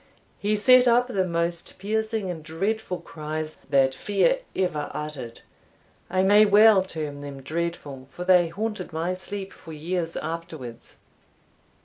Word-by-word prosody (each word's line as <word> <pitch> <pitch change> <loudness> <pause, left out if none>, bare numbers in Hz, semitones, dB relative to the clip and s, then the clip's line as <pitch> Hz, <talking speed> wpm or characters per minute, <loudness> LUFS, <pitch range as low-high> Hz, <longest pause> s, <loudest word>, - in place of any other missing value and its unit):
He 210 +1 +1
set 255 +4 +6
up 245 +1 +4
the 190 -6 0
most 170 0 -2
piercing 220 +1 -1
and 165 -3 -7
dreadful 185 +5 -3
cries 155 0 -5
that 135 -1 +4
fear 355 - +1 0.2
ever 180 -6 -1
uttered 150 -6 -6 0.7
I 185 +1 +2
may 205 +2 +7
well 210 0 +7
term 155 -6 -5
them 140 -1 -8
dreadful, 155 -4 -4
for 180 - -7
they 180 -2 +5
haunted 210 +2 -4
my 165 +3 -1
sleep 190 +1 -6
for 165 - -11
years 165 +2 -3
afterwards. 160 -8 -7
175 Hz, 135 wpm, -25 LUFS, 155-205 Hz, 0.7 s, may